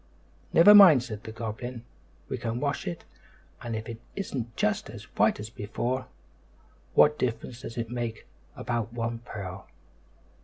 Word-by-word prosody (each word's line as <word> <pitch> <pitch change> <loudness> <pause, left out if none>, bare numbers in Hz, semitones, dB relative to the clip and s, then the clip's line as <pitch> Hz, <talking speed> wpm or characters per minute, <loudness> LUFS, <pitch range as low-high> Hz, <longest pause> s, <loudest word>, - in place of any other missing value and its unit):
"Never 175 +5 +8
mind," 180 -11 +9
said 110 -4 -7
the 110 - -7
goblin, 115 +2 -6 0.4
"we - - -3
can 115 +1 -3
wash 140 0 -2
it, 85 - -5 0.6
and 115 -1 -4
if 110 0 -5
it 115 0 -7
isn't 125 - -4
just 105 - 0
as - - -9
white - - +3
as 105 +1 -7
before, 120 +5 -3 0.9
what 150 0 +5
difference 120 0 -3
does 120 -2 -8
it 115 -1 -3
make 120 -2 -4 0.3
about 120 -2 -3
one 115 -1 -3
pearl?" 95 -5 -8
115 Hz, 150 wpm, -28 LUFS, 110-125 Hz, 0.9 s, mind